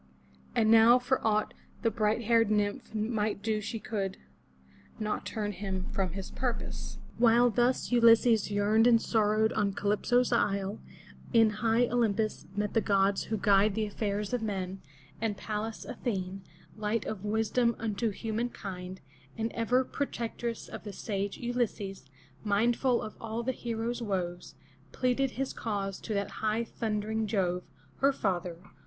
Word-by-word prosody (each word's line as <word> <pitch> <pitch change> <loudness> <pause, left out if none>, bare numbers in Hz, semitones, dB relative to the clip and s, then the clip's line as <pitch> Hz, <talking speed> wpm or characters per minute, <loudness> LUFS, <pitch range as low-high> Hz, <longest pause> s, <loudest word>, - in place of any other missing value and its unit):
And 220 -2 +4
now 225 +2 +8
for 255 +1 0
aught 215 -1 +1 0.3
the 230 - +3
bright 215 +1 +1
haired 230 -1 +4
nymph 205 0 -1
might 215 -2 -1
do 215 -1 0
she 220 +2 -4
could 195 -3 -3 0.8
not 215 -1 -2
turn 210 -2 -2
him 190 -1 -4
from 185 -3 -1
his 195 0 -6
purpose. 65 0 -4 0.2
While 240 +1 +5
thus 245 +4 +1
Ulysses 230 -2 +5
yearned 210 +3 +3
and 235 -2 +6
sorrowed 220 -1 +2
on 205 -2 +1
Calypso's 240 +5 +2
isle, 200 -3 +1 0.5
in 225 -2 +6
high 225 +3 +2
0 245 - -1
lym'pus 215 -5 0
met 205 0 -1
the 225 - +3
gods 195 -1 +2
who 220 - -2
guide 200 0 +4
the 220 -1 0
affairs 205 0 -2
of 245 - 0
men, 190 -3 -3 0.4
and 215 -3 -1
Parias 220 +1 -4
A - - -6
the'ne, 195 -4 -2 0.3
light 215 +1 -1
of 210 -3 -5
wisdom 225 +3 +1
unto 225 +1 -1
human 225 +3 -2
kind, 185 -3 -7 0.4
and 225 0 -1
ever 245 +3 +2
protectress 235 -4 -4
of - - -8
the 205 -1 -7
sage 200 0 -3
Ulysses, 230 - -2 0.4
mindful 235 +4 +2
of 215 - -7
all 225 +1 -3
the 260 - 0
hero's 235 0 -3
woes, 180 -5 -3 0.4
pleaded 255 +1 +1
his 270 0 -2
cause 200 -3 -3
to 215 - -3
that 200 0 -3
high 220 +1 +1
thundering 220 -1 -2
Jove, 180 -4 0 0.4
her 275 +1 +4
father. 180 -8 -2
215 Hz, 150 wpm, -30 LUFS, 200-230 Hz, 0.8 s, now